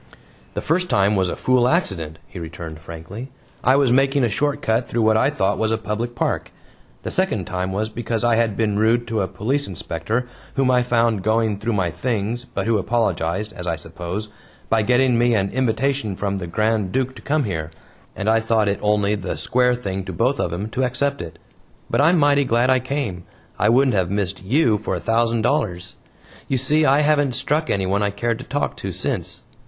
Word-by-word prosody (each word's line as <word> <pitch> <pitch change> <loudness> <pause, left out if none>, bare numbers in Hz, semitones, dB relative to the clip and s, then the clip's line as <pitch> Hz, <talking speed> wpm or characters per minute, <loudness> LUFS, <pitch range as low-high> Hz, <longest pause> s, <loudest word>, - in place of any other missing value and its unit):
"The - - -3
first 180 +3 0
time 100 +1 +3
was 95 -2 +1
a - - -3
fool 125 -1 +2
accident," 95 - 0
he 90 - -10
returned 80 -1 -7
frankly. 85 - -8 0.3
"I 130 - +5
was 140 -3 +3
making 135 +1 +3
a 120 - +3
short 145 +7 0
cut 115 +2 +1
through 115 -1 0
what 110 0 +4
I 130 +5 +3
thought 105 -9 0
was 110 0 +1
a 110 - +2
public 110 +3 -3
park. - - -1 0.5
The - - -4
second - - 0
time 90 +1 -3
was 105 +3 -1
because 115 0 -3
I 120 -1 +3
had 110 -3 +1
been 105 -2 +1
rude 115 +2 +3
to 110 -2 0
a 95 - 0
Police 135 +10 -1
Inspector 95 +7 -3 0.3
whom 135 -2 +3
I 125 -1 +4
found 115 -4 +1
going 110 0 +1
through 115 +1 -1
my 95 -4 0
things, 115 +5 -2
but - - -4
who 115 -2 +2
apologized 100 -2 -1
as 90 -1 -7
I 85 - 0
suppose 90 +5 -6 0.4
by 110 0 +3
getting 125 +2 +3
me 120 -1 +3
an 100 -1 0
invitation 130 -3 0
from 100 0 -2
the 90 - -5
Grand 105 +1 0
Duke 130 +2 -1
to - - -11
come 150 0 +1
here, 85 -8 -3 0.5
and 100 - -4
I 110 +1 +4
thought 110 -1 +1
it 100 - 0
only 105 -1 +2
the 100 -4 -3
square 125 +1 +2
thing 95 -5 -4
to 95 - -5
both 125 +10 +1
of 85 - 0
'em 100 +6 -4
to 130 - -1
accept 140 +3 -1
it. 85 0 -8 0.5
But - - +3
I'm 165 +5 +5
mighty 145 -2 +4
glad 125 0 +2
I 130 - +4
came; 125 -9 -3 0.4
I 105 - +3
wouldn't 130 +3 +4
have 95 -3 +1
missed 100 -1 -2
YOU 110 +1 +2
for 110 - -2
a - - -3
thousand 115 0 +1
dollars. 95 -12 -1 0.5
You 135 - +1
see 150 +4 +3
I 140 +3 +4
haven't 145 -4 +2
struck 155 +2 0
anyone 100 +1 +1
I 105 - +2
cared 115 +3 -2
to 130 - -8
talk 145 +1 -2
to - - -4
since." - - -3
110 Hz, 210 wpm, -21 LUFS, 100-130 Hz, 0.5 s, I